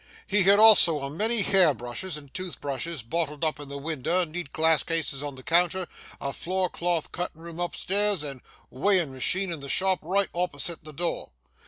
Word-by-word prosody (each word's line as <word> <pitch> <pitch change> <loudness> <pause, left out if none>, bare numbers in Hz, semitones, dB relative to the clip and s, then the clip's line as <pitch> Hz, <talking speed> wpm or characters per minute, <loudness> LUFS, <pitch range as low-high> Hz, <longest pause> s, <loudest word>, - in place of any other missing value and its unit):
He 205 0 +2
had 200 +2 +6
also 205 -8 +7
a 140 - -4
many 215 +6 +2
hair 185 -7 +4
brushes 125 - -5
and 145 -3 -14
tooth 185 -2 -6
brushes 145 +1 -4
bottled 150 +4 -3
up 155 -2 -1
in 145 -1 -8
the 140 - -6
winder, 160 +4 -1
neat 165 -2 -6
glass 160 -1 +3
cases 160 -4 -1
on 145 -2 -5
the 130 - -12
counter, 175 +3 +2 0.3
a 140 0 -4
floor 185 +1 -1
clothed 170 -2 -1
cuttin' 170 -2 -6
room 170 0 -9
up 175 0 -3
stairs, 200 -3 0
and 135 -3 -6 0.3
a - - -20
weighin' 175 -1 +2
macheen 185 +9 0
in 165 - -5
the 140 0 -8
shop, 190 +2 +2
right 195 +4 +1
opposite 170 -1 -3
the 155 - -9
door. 170 +4 -3
165 Hz, 200 wpm, -26 LUFS, 145-185 Hz, 0.3 s, also